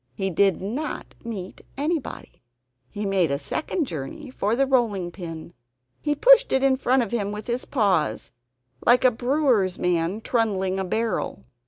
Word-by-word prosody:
He 195 +5 -2
did 190 +1 +2
not 260 +10 -4
meet 205 -6 -7 0.2
anybody. 305 +1 -3 0.5
He 205 0 -5
made 190 -5 +2
a 140 - 0
second 300 - -2
journey 250 - -7
for 215 -3 0
the 275 +2 +3
rolling 220 -9 +1
pin. 170 -2 -8 0.5
He 295 0 0
pushed - - +6
it 265 0 +2
in 270 -1 +4
front 260 -1 +2
of 230 - -6
him 205 -4 -1
with 210 0 -6
his 240 +1 -2
paws, 185 - 0 0.5
like 245 +2 +5
a 255 - +7
brewer's 245 -6 +1
man 175 +3 0
trundling 195 -5 0
a - - 0
barrel. 220 - -2
215 Hz, 160 wpm, -24 LUFS, 185-260 Hz, 0.5 s, a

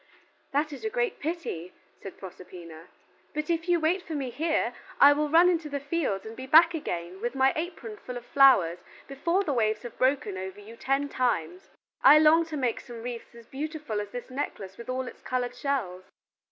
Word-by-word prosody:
"That 295 +2 0
is 280 - -9
a 440 - -1
great 485 -2 -1
pity," 290 - -4 0.3
said 195 - -9
Proserpina, 175 -3 -11 0.5
"but 305 +2 -1
if 335 +1 -2
you 345 -1 +4
wait 335 +4 +1
for 325 -3 -6
me 270 -4 -3
here, 315 +6 0 0.3
I 285 +1 +9
will 300 +1 -1
run 345 +3 +6
to 310 -2 -9
the 285 0 -3
fields 280 - -2
and 220 +1 -8
be 260 +2 -8
back 330 +5 +7
again 180 - -5
with 240 +3 -3
my 265 0 +3
apron 315 - -5
full 250 +3 -7
of 240 - -10
flowers 245 -13 +5 0.3
before 335 +8 0
the 295 - -1
waves 215 -3 0
have 240 - -9
broken 255 -8 +1
over 190 +1 -7
you 215 +3 -12
ten 275 +4 0
times. 185 - -2 0.3
I 290 +3 +9
long 315 +2 +5
to 310 -2 -5
make 250 -4 0
you - - -14
some 235 -2 -9
wreaths 240 -1 -7
as 235 -1 -13
beautiful 290 -4 -4
as 205 - -7
this 245 +3 -8
necklace 200 -8 -5
with 235 +3 -11
all 255 0 -2
its - - -10
colored 250 -1 -2
shells." 240 -10 -3
260 Hz, 205 wpm, -27 LUFS, 215-305 Hz, 0.5 s, I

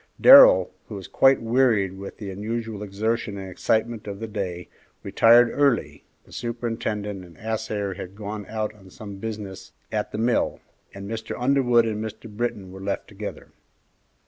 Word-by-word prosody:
Darrell, - - +9 0.2
who - - -7
was - - -8
quite 135 -2 +4
wearied 115 -5 +2
with 100 +1 -9
the 100 -3 -6
unusual 110 +2 -4
exertion 105 +1 -2
and 95 -1 -6
excitement 110 +4 -1
of 100 -1 -6
the 115 - -4
day, 90 -5 -5 0.4
retired 120 +1 +5
early, 140 -5 +1 0.2
the - - -20
superintendent 115 -4 -4
and 85 -3 -15
assayer 110 -3 -3
had 95 0 -9
gone 105 -1 -6
out 110 -1 -3
on 95 -3 -17
some 100 +1 -9
business 105 -2 -7 0.2
at 105 -1 -2
the - - -5
mill, 115 +2 +1 0.3
and 100 0 -9
Mr. 110 +1 -5
Underwood 125 -2 +3
and 110 -1 -2
Mr. 110 +1 -7
Britton 105 -3 -4
were 95 0 -10
left 100 0 -3
together. 105 0 -8
110 Hz, 160 wpm, -24 LUFS, 100-115 Hz, 0.4 s, Darrell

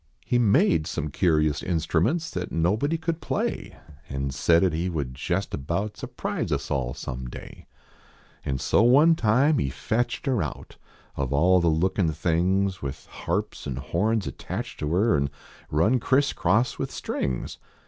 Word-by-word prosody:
He 125 - +2
made 90 -8 +3
some 75 - -3
curious 75 -3 +2
instruments 90 - 0
That 90 0 -4
nobody 105 - +1
could 165 0 -3
play. - - -3 0.3
And 70 0 -3
said 85 +5 +3
at 90 -4 +2
he 85 +3 -1
would 70 -7 -3
jest 90 +8 -2
about 85 +10 -2
Surprise - - -4
us - - -2
all 60 -3 -1
some 65 -1 -6
day. - - -11 0.8
And 65 -1 -2
so - - +3
one 140 +8 +6
time 135 +3 +3
lie 70 - 0
fetched 120 - -2
er 130 -5 +2
out, - - -6 0.4
Of 70 -1 -2
all 90 +6 +4
the 85 - +1
lookin 90 +3 +2
tilings, 90 +4 0
With 70 0 -6
harps - - -4
an 65 - -3
horns 95 - 0
attached - - -6
to 75 - -2
er 100 0 +3
An 70 -1 +1 0.4
run 95 +12 +3
criss 140 +4 +2
cross 110 +8 +1
with - - -2
strings. 65 -2 -3
90 Hz, 160 wpm, -25 LUFS, 75-110 Hz, 0.8 s, one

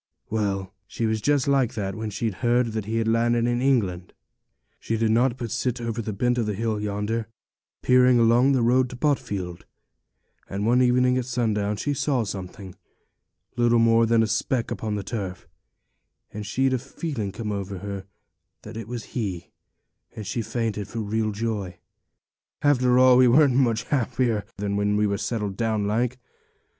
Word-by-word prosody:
Well, 100 -3 -1
she 115 - -3
was 110 -1 0
just 145 +2 +2
like 135 -3 +2
that 100 -3 -3
when 110 -1 -4
she'd 110 +1 -2
heard 120 -1 +2
that 110 -2 -3
he 110 +2 -2
was 115 - +1
landed 115 +1 +2
in 120 0 0
England; 100 -10 0 0.7
she 115 - -2
did 110 0 +1
nought 120 +2 +2
but 120 -4 -5
sit 125 +3 -1
over 115 -1 -3
the 110 - -4
bent 120 +4 0
of 115 - 0
the 105 - -2
hill 110 0 -1
yonder, 105 +2 -2 0.6
peering 125 -1 +5
along 120 +4 +4
the 125 -3 +2
road 125 +2 +3
to 125 - -8
Botfield; 100 - -2 0.9
and 100 +1 -3
one 120 +3 +4
evening 125 0 +3
at 125 - -3
sundown 110 -4 -1
she 145 - -1
saw 135 -3 0
something, 95 -1 -7 0.8
little 120 0 +3
more 115 0 +4
than 115 0 +4
a - - 0
speck 115 +3 -1
upon 110 -1 -3
the 100 - -3
turf, 95 -6 -5 0.9
and 105 -1 -6
she'd 130 +6 +1
a 130 - +1
feeling 130 -5 -5
come 105 +1 -5
over 100 -1 -4
her 100 0 -6 0.6
that - - -9
it 115 -2 -6
was 120 -1 -5
he, 100 -8 -4 0.6
and 110 - -6
she 115 +5 -2
fainted 110 -3 -3
for 115 +2 -5
real 110 +1 -1
joy. 105 -4 -3 0.9
After 125 -4 +4
all, 130 -1 +7
we 130 0 +6
weren't 140 +2 +5
much 120 -4 +2
happier 120 -5 0
when 100 +1 0
we 105 - +2
were 100 -1 -1
settled 105 -5 -3
down 110 -3 0
like. 120 +4 0
115 Hz, 175 wpm, -24 LUFS, 105-125 Hz, 0.9 s, all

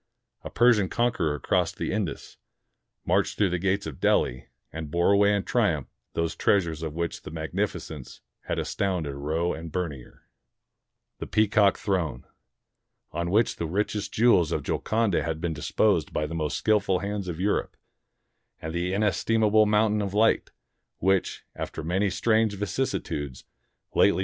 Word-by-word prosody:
A - - -6
Persian 115 -6 +4
conqueror 105 -12 0
crossed - - 0
the - - -2
Indus, - - -4 0.7
marched - - +1
through 100 -4 +2
the 90 - 0
gates 95 +2 0
of 75 -5 -7
Delhi, 60 +1 +1 0.3
and 80 -1 -5
bore 85 +4 +2
away 100 0 +5
in 100 - -1
triumph 90 - 0 0.2
those 85 0 -1
treasures 85 -6 +1
of 80 -2 -4
which 85 -1 -3
the - - -9
magnificence 80 -2 -4 0.3
had - - -2
astounded 90 -7 -1
Roe 80 +5 -1
and 80 0 -7
Bernier, 75 -8 -5 0.5
— - - -57
the - - -5
Peacock 105 -2 +3
Throne, 90 -7 -2 0.9
on 85 0 -2
which 110 +6 +2
the 85 - -2
richest 105 +3 -2
jewels 110 -8 +4
of - - -1
Golconda 110 -6 0
had 80 +1 -3
been 85 -1 -2
disposed 75 - +1
by 75 - -1
the 75 - -6
most 80 -2 -1
skillful 100 -3 +2
hands 100 0 -4
of 85 -2 -5
Europe, 100 +2 -1 0.8
and 80 0 -6
the 90 +2 -1
inestimable 110 +1 +3
Mountain 105 0 +2
of 100 -1 -3
Light, 110 +2 +3 0.5
which, 95 0 0
after - - -5
many 95 +5 +1
strange 110 +2 +2
vicissitudes, 85 - -3 0.5
lately. - - +4
95 Hz, 150 wpm, -26 LUFS, 80-105 Hz, 0.9 s, away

